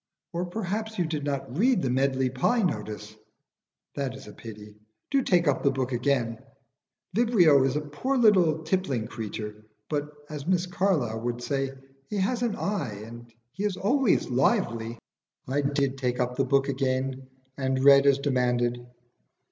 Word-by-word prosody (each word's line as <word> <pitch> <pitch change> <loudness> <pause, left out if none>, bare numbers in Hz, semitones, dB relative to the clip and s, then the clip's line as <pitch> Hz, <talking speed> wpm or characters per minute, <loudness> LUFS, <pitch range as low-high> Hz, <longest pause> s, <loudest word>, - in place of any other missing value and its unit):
"Or 175 +1 -2
perhaps 220 +3 -3
you 175 - +1
did 155 -2 -3
not 135 -3 -3
read 240 - +3
the 130 - +1
'Medley 130 0 +1
Pie' 220 - +1
notice? 105 - -3 0.8
That 135 -2 -3
is 135 - -11
a - - -11
pity. 105 -2 -10 0.4
Do 275 -1 +3
take 175 -8 +2
up 145 - +2
the 140 - +3
book 135 -1 -2
again. 120 -2 0 0.8
Vibrio 185 - +5
is 135 0 +1
a 150 - 0
poor 150 - -2
little 180 -9 +4
tippling 155 - -1
creature, 105 -1 -6 0.3
but, 150 0 -1 0.2
as 145 -2 -7
Mr 180 0 0
Carlyle 150 - 0
would 120 0 -3
say, 135 -1 -1 0.4
he 210 - -3
has 230 +5 0
an 235 -4 0
eye, 140 - -3
and 120 +1 -11 0.2
he 195 - -5
is 205 -3 -1
always 250 +3 +2
lively." 115 -2 +1 0.5
I 140 +3 +1
did 140 -1 0
take 125 -2 -1
up 125 0 0
the 135 +1 +1
book 135 +1 +2
again, 130 -1 -1 0.3
and 130 -1 -1
read 140 0 +7
as 140 -1 +5
demanded. 125 -3 0
140 Hz, 165 wpm, -27 LUFS, 125-180 Hz, 0.8 s, read